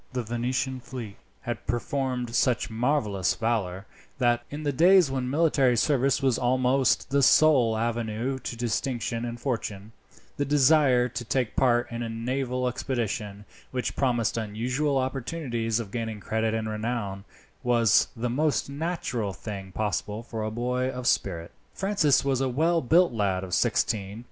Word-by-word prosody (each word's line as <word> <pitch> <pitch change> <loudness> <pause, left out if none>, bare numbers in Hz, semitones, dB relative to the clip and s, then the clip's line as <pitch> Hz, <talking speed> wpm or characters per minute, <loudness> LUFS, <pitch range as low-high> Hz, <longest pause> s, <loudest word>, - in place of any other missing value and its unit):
The 125 -1 -2
Venetian 125 +3 -2
fleet 120 -4 -8 0.2
had 120 -2 -5
performed 125 0 -2
such 125 -1 +1
marvels 110 -6 0
of - - -21
valour, 100 -5 -1 0.3
that, 120 -2 +2
in 150 +2 -6
the 145 - +1
days 175 +1 +5
when 130 -2 -2
military 140 -4 +3
service 135 +1 +2
was 130 -4 +2
almost 130 +1 +2
the 140 0 +3
sole 130 -5 +5
avenue 115 +3 -2
to 125 - -5
distinction 115 0 -2
and 120 0 -5
fortune, 110 -5 -4 0.5
the 145 - +1
desire 140 -3 +4
to 120 - -5
take 125 0 -1
part 120 -2 +2
in 115 0 -4
a 115 - -3
naval 125 +2 -2
expedition, 110 -5 -3 0.2
which 125 -1 -3
promised 120 -4 +1
unusual 125 +7 -1
opportunities 130 -3 -2
of 110 -4 -6
gaining 115 -2 -4
credit 110 +1 -1
and 110 -1 -2
renown, 105 -3 -3 0.4
was 120 -4 +4
the 120 +2 -2
most 140 +3 0
natural 140 - -2
thing 95 -2 -7
possible 105 +2 -2
for 115 -2 -5
a 110 - -1
boy 125 +3 -1
of 125 -1 -6
spirit. 85 -8 0 0.2
Francis 190 -9 +2
was 135 -2 +1
a 135 - +1
well 165 +6 +2
built 165 +3 +4
lad 100 -4 0
of 95 - -6
nearly - - -7
sixteen. 100 0 0
120 Hz, 155 wpm, -26 LUFS, 110-135 Hz, 0.5 s, days